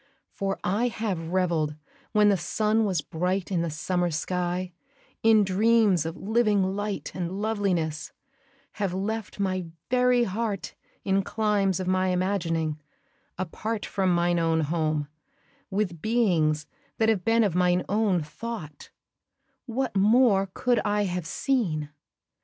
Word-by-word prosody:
For 195 0 -2
I 210 +7 +1
have 195 -8 -3
revell'd, 170 -5 +1 0.4
when 210 -1 +5
the 200 - +4
sun 215 +4 +1
was 185 -6 0
bright 180 +5 -2
I' 185 - +1
the 170 0 0
summer 175 +3 -1
sky, 180 +3 -2 0.5
in 220 -1 +5
dreams 200 -3 +3
of 165 - -6
living 205 -3 +1
light 205 0 -3
And 180 +1 -4
loveliness, 180 -8 -1 0.7
have 190 -3 0
left 210 +2 -3
my 185 -3 -1 0.2
very 250 -1 +4
heart 205 -2 -3 0.3
In 195 0 +2
climes 200 -2 0
of 185 - -2
my 185 0 +2
imagining, 165 -5 -1 0.6
apart 210 +5 -3
From 190 -2 0
mine 175 0 +2
own 165 -1 +2
home, 155 -1 0 0.6
with 190 -5 -2
beings 170 -10 +2 0.3
that 225 - +2
have 205 -5 +1
been 230 +2 +3
Of 200 -5 +1
mine 180 0 +2
own 200 -5 +1
thought 160 -2 -7 0.8
what 250 0 -2
more 205 -1 +4
could 245 -2 +2
I 210 0 +1
have 180 -3 -3
seen? 170 - -1
190 Hz, 135 wpm, -26 LUFS, 175-215 Hz, 0.8 s, when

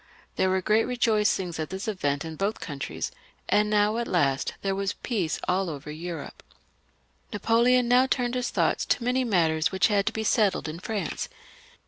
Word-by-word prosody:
There 190 - +2
were 185 0 +1
great 215 +3 +3
rejoicings 210 -8 +1
at 155 - -3
this 190 +3 -5
event 145 -9 -1
in 160 -1 -6
both 200 +5 -1
countries; 135 - -5 0.4
and 210 0 +3
now, 210 +1 +2
at 235 0 -2
last, 140 -6 +1
there 195 -1 0
was 195 0 -1
peace 195 -10 -2
all 185 0 +1
over 150 -1 -7
Europe. 165 +2 -7 0.9
Napoleon 235 +3 +3
now 250 +2 +5
turned 245 -2 0
his 250 -1 -1
thoughts - - +1
to 240 - +1
many 250 +2 +1
matters 165 -8 +2
which 190 +2 +3
had 200 -2 +1
to - - +2
be 220 0 -3
settled 210 -5 +2
in 155 +2 -6
France. 210 +1 -3
200 Hz, 175 wpm, -26 LUFS, 170-225 Hz, 0.9 s, now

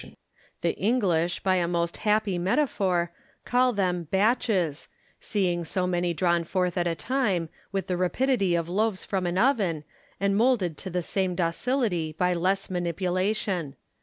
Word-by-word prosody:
The - - 0
English, 180 -7 +1
by 185 -1 +2
a 175 -1 +1
most 170 -1 -1
happy 210 -4 +1
metaphor, 185 - +1 0.3
call 250 +1 +3
them 180 -6 -1
hatches, 195 - +1 0.3
seeing 180 -5 0
so 180 +3 -1
many 175 -1 0
drawn 170 0 +1
forth 180 +1 -1
at 175 -1 +1
a 165 - 0
time, 200 -9 0 0.2
with 195 -1 -2
the 180 - -1
rapidity 195 0 +1
of 170 -1 -1
loaves 205 +2 0
from 190 -3 -1
an 175 +1 -1
oven, 195 - +2 0.4
and 200 0 +1
moulded 215 -7 +2
to 190 - -6
the 180 0 -2
same 185 0 -1
ductility 175 - 0
by 180 0 +2
less 190 +3 0
manipulation. 180 -1 -1
185 Hz, 150 wpm, -26 LUFS, 175-205 Hz, 0.4 s, call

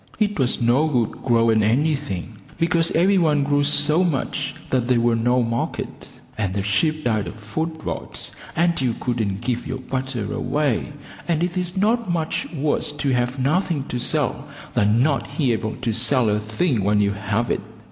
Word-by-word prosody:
It 210 -4 0
was 125 -2 +2
no 120 +6 +3
good 125 -7 -1
growing 115 -3 +3
anything, 125 - 0 0.2
because 165 0 +2
every 190 +4 +4
one 150 -4 +3
grew 145 0 +2
so 150 +4 +3
much 140 -3 -1 0.2
that 125 -2 +1
there 125 -2 +3
was 115 -1 +2
no 125 +2 +2
market, 115 0 -3 0.3
and 100 -3 -1
the 100 - -1
sheep 155 +11 +1
died 110 -5 0
of - - -7
foot 160 +10 -4
rot - - -5 0.2
and 170 -2 +2
you 120 -3 0
couldn't 110 -5 -1
give 120 0 -2
your 130 - -3
butter 130 -4 -3
away, 145 -2 0 0.4
and 170 -1 +1
it 175 0 -1
is 180 0 -2
not 225 +2 +1
much 165 -2 -2
worse 150 -2 -1
to 145 -2 -1
have 125 +2 0
nothing 150 +2 +1
to 125 - -2
sell - - -1 0.2
than 105 +4 +3
not 140 0 -1
be 130 -7 +2
able 110 -1 -2
to 120 -3 -2
sell 120 +1 +3
a 105 - +1
thing 110 - 0
when 105 +1 +3
you 100 -1 +2
have 105 +3 -1
it. - - 0
130 Hz, 180 wpm, -22 LUFS, 115-155 Hz, 0.4 s, every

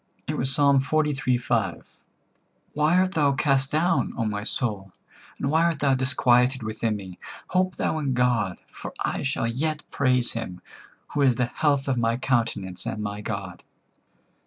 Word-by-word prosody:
It - - -2
was 130 - 0
Ps. - - -1
xliii. 140 -1 +2
5: 115 -4 -1 0.9
"Why 150 +4 +3
art 185 0 +3
thou 145 -5 +2
cast 135 -1 +2
down, 165 +5 +1
O 115 - 0
my 105 -1 -2
soul? 105 -5 -3 0.5
And 140 - -1
why 160 +2 +3
art 170 -3 +1
thou 140 -2 +3
disquieted 130 -1 +3
within 110 0 -2
me? 95 -3 -9 0.3
Hope 185 0 +1
thou 160 - -1
in 135 -4 -1
God: 120 -6 +1
for - - -8
I - - -2
shall 135 -3 -1
yet 150 +6 -2
praise 125 -3 +2
him, 100 -6 -5 0.5
who 145 - 0
is 130 -3 +4
the 125 +1 +1
health 140 +2 0
of 130 -2 +1
my 115 0 +1
countenance, 110 -8 -1
and 105 - -3
my 105 0 -4
God." 100 -5 -5
130 Hz, 165 wpm, -25 LUFS, 115-145 Hz, 0.9 s, is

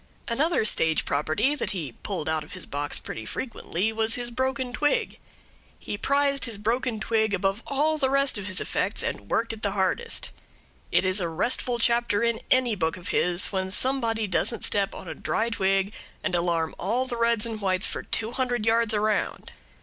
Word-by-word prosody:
Another 280 +2 +2
stage 160 -6 +3
property 155 - +1
that 295 - -1
he 160 -9 -4
pulled 190 -7 -3
out 160 -1 0
of 150 - -12
his 185 - -6
box 145 +1 -3
pretty 110 - -6
frequently 220 - -2
was 225 +1 +2
his 240 -1 -4
broken 260 0 -1
twig. 295 +3 0 0.6
He - - -5
prized 280 +4 +2
his 230 -4 -3
broken 230 +2 -1
twig 220 -2 +1
above 195 +3 0
all 305 +3 +1
the 265 -2 +2
rest 275 0 +2
of 205 -2 -2
his 185 -2 -2
effects, - - -1
and 100 - -4
worked 230 0 0
it 220 - -9
the 200 -2 -1
hardest. 205 - 0 0.6
It - - +3
is 185 +1 +2
a 170 - -1
restful 240 +8 0
chapter 235 -2 +2
in 235 -1 +1
any 255 -3 +4
book 165 -3 -1
of 180 0 -7
his 175 +1 +1
when 190 -1 -1
somebody 230 0 +1
doesn't 205 +4 0
step 200 -1 +1
on - - -9
a - - -4
dry 230 +1 -1
twig 195 -1 +1 0.3
and - - -1
alarm 170 -2 +1
all 235 +8 0
the 245 - -4
reds 230 -1 +2
and 225 -2 -5
whites 185 -1 +1
for - - -3
two 225 +1 -1
hundred 245 -4 -1
yards 225 -1 +3
around. 215 0 0
220 Hz, 190 wpm, -26 LUFS, 190-245 Hz, 0.6 s, any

